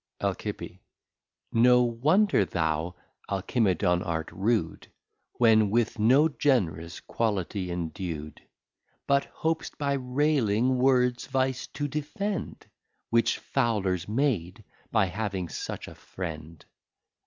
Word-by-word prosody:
Alci. - - -4 0.7
No 125 +2 +5
wonder 145 - +3
thou 80 0 -1 0.3
Alcimedon 95 -3 +1
art 80 -3 -3
rude, 95 -2 -1 0.5
When 110 -3 +4
with 115 +1 0
no 130 +8 +5
Gen'rous 95 - 0
Quality 100 -4 -2
endu'd: 85 -3 -5 0.6
But 140 0 +2
hop'st 160 0 -3
by 140 -1 0
railing 130 -3 +1
Words 125 -1 +2
Vice 130 -1 -1
to 145 - -4
defend, 155 +7 -4 0.5
Which 115 0 +3
Foulers 100 -9 -1
made, 110 - -1 0.3
by 110 -4 +3
having 95 -2 -3
such - - -5
a - - -9
Friend. 80 -3 -8
110 Hz, 100 wpm, -27 LUFS, 90-130 Hz, 0.7 s, No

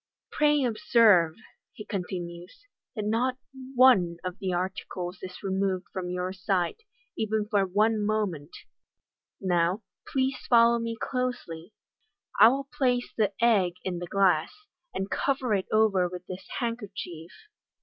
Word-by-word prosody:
" - - -65
Pray 295 -1 +3
observe," 225 - +4 0.4
he 210 - -9
continues, 180 - -6
" - - -62
that 215 -3 -3
not 245 +4 0 0.4
one 200 -10 +5
of 185 +2 -5
the 190 -1 -2
articles 180 0 -4
is 185 +1 -9
removed 190 -1 -1
from 180 -1 -4
your 180 +1 -3
sight, 185 - -1 0.4
even 215 -1 -1
for 200 -2 +1
one 210 +3 +2
moment. 205 -9 -1 0.9
Now, 180 +2 +1 0.3
please 265 0 0
follow 235 0 +5
me 230 0 -4
closely. 240 -11 -4 0.7
I - - +10
will 270 +3 0
place 250 -4 0
the 210 -3 +1
egg 195 -7 +3
in 180 -2 -3
the 175 - -6
glass, 180 -5 +2 0.4
and 190 +1 -4
cover 260 -4 0
it 190 -2 0
over 205 -5 +3
with 180 0 -8
this 185 +1 -8
handkerchief." 200 -8 -5
195 Hz, 140 wpm, -27 LUFS, 180-230 Hz, 0.9 s, I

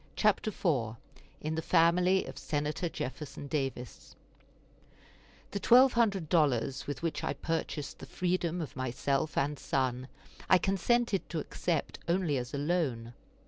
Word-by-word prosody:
CHAPTER 215 +1 +2
IV 135 - 0 0.5
IN 155 +1 -2
THE 160 - -1
FAMILY 180 +3 +3
OF - - -8
SENATOR 150 +3 -2
JEFFERSON 145 0 -6
DAVIS 135 -3 -4 1.4
The 200 - -2
twelve 250 +5 +6
hundred 200 -8 +2
dollars 135 -5 +1
with 145 +1 -5
which 165 - -2
I - - 0
purchased 150 -1 -3
the - - -9
freedom 180 -1 -1
of 155 - -6
myself 135 +3 -1
and 145 0 0
son 130 -1 -1 0.4
I 185 - +8
consented 195 +3 +1
to 170 - -3
accept 165 +1 -2
only 170 -4 +1
as 125 0 -4
a 145 - -3
loan. 140 -7 -1
155 Hz, 140 wpm, -31 LUFS, 135-180 Hz, 1.4 s, I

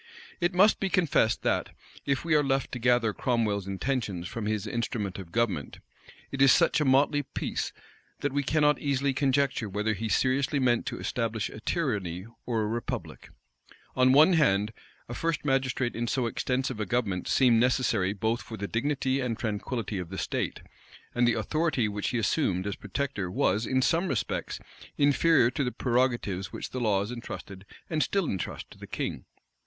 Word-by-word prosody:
It 175 0 0
must 200 +4 +5
be 195 - 0
confessed 170 - +2
that, - - 0 0.3
if 140 +3 0
we 165 - +1
are 150 -1 +5
left 135 -1 0
to 125 - -4
gather 120 -2 +3
Cromwell's 105 -6 0
intentions 100 -3 -2
from 105 +2 -4
his 105 -1 -1
instrument 105 -3 -3
of 90 -3 -9
government, 100 - -1 0.5
it 135 - -3
is 135 -1 +8
such - - +4
a - - +2
motley 140 +2 +4
piece, 135 -1 -3 0.5
that 145 -2 -1
we 145 - +1
cannot 150 +1 +2
easily 140 -1 0
conjecture 135 -4 +1
whether 105 +3 0
he 110 +2 -4
seriously 135 +5 +1
meant 125 -3 +2
to - - -3
establish 115 -3 -2
a - - -9
tyranny 105 - -2 0.2
or 115 -3 0
a - - -1
republic. 115 +2 -5 0.7
On 130 0 +5
one 155 +7 +7
hand, 105 - +2 0.3
a 120 - -6
first 165 +3 -2
magistrate 130 -3 0
in 120 +1 -2
so 125 +1 0
extensive 130 +1 -1
a 105 - -1
government 100 -5 -1
seemed 120 -4 +4
necessary 120 -6 +2
both 110 +3 -1
for 110 - -8
the 100 0 -4
dignity 135 +3 0
and 125 -4 -2
tranquillity 110 -1 -3
of 90 -2 -6
the 95 - -6
state; - - -2 0.5
and 120 0 +3
the 120 - +3
authority 140 +1 0
which 105 -1 -3
he 125 - -1
assumed 100 - +1
as 100 -1 -2
protector 105 -2 -3
was, 100 +4 +1
in 130 0 +2
some 170 +6 +2
respects, - - -2 0.4
inferior 145 -2 +4
to 140 +2 -1
the 125 - -1
prerogatives 120 -8 0
which - - -6
the 130 - -3
laws 105 -1 +1
intrusted 100 -5 -8 0.2
and 155 -2 -1
still 195 +6 +1
intrust 95 - -4
to - - -15
the - - -9
king. - - -4
120 Hz, 180 wpm, -28 LUFS, 105-140 Hz, 0.7 s, is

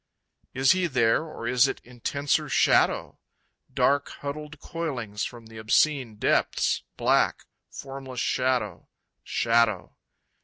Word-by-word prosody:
Is 130 0 +4
he 185 -1 +2
there 125 +1 +2
or 155 -7 -8
is 125 +2 +4
it - - -4
intenser 130 +4 -2
shadow? - - +2 0.5
Dark 140 0 +2
huddled 150 +1 -7
coilings 125 -13 -4
from 120 -2 -9
the 110 0 -11
obscene 120 +2 +2
depths, - - +1 0.2
Black, - - +2 0.2
formless 135 -2 -8
shadow, 125 -8 -1 0.3
Shadow. 115 -4 +1
130 Hz, 110 wpm, -26 LUFS, 115-145 Hz, 0.5 s, Is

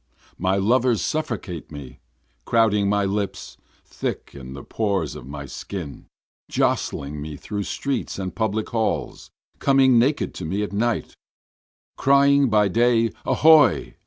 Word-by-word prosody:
My 95 +1 +1
lovers 115 +3 +2
suffocate 105 - -4
me, 65 -4 -10 0.4
Crowding 105 - +2
my 100 0 +1
lips, 100 0 -3 0.3
thick - - -5
in 65 -2 -9
the 70 - -9
pores 100 -8 -1
of 60 - -10
my 70 0 -7
skin, 80 +2 -7 0.4
Jostling 75 +1 -1
me 75 0 -6
through 105 +4 -5
streets 140 -1 -3
and 95 -1 -4
public 110 -1 -2
halls, 110 -2 -2 0.3
coming 135 -3 +4
naked 140 +5 +1
to - - -7
me 95 +6 -1
at 105 - -5
night, 115 +1 -1 0.8
Crying 140 0 +4
by 105 -2 +3
day, 115 +2 +2 0.2
Ahoy! 155 -6 +5
105 Hz, 130 wpm, -23 LUFS, 90-120 Hz, 0.8 s, Ahoy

